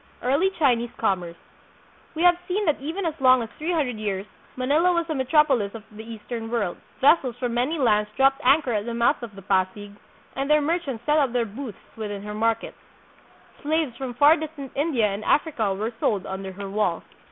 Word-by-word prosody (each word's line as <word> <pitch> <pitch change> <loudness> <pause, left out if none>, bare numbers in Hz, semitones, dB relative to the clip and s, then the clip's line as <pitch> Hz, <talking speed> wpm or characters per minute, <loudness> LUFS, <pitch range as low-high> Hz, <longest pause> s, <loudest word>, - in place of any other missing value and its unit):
Early 280 +10 +2
Chinese 240 -6 +2
Commerce. 180 -6 -1 0.8
We 325 - -1
have 355 0 +6
seen 410 +3 0
that 305 -5 +1
even 330 +7 -3
as 325 - 0
long 255 -2 +5
ago 225 - -9
as - - -25
three 320 +3 -1
hundred 280 -9 0
years 200 -2 -3 0.3
Manila 295 +8 +3
was 340 -1 0
a - - 0
metropolis 265 -6 +2
of 220 - -8
the 215 - -8
Eastern 225 0 -7
world. 215 -7 -1 0.2
Ves 300 +5 +7
sels 250 -4 -5
from 245 -1 -2
many 255 +7 0
lands 210 -6 +2
dropped 270 0 +3
anchor 270 -1 +4
at 210 +1 -2
the 235 - -3
mouth 235 +5 +2
of 225 -4 -8
the 195 - -11
Pasig, 195 +1 -1 0.4
and 275 +1 -2
their 300 0 +5
merchants 290 -6 -2
set 300 +1 +3
up 270 -5 +1
their 240 -2 +1
booths 225 +1 -7 0.2
within 205 -2 -5
her 210 0 -6
markets. 225 +1 -1 0.8
Slaves 305 -4 0
from 250 -1 -6
far 295 +5 +6
distant 300 -3 -7
India 280 -6 +1
and 205 +1 -2
Africa 265 -9 +1
were 220 +4 -3
sold 200 -3 0
under 190 0 -5
her 200 +1 -7
walls. 195 -4 -1
245 Hz, 200 wpm, -24 LUFS, 210-295 Hz, 0.8 s, Ves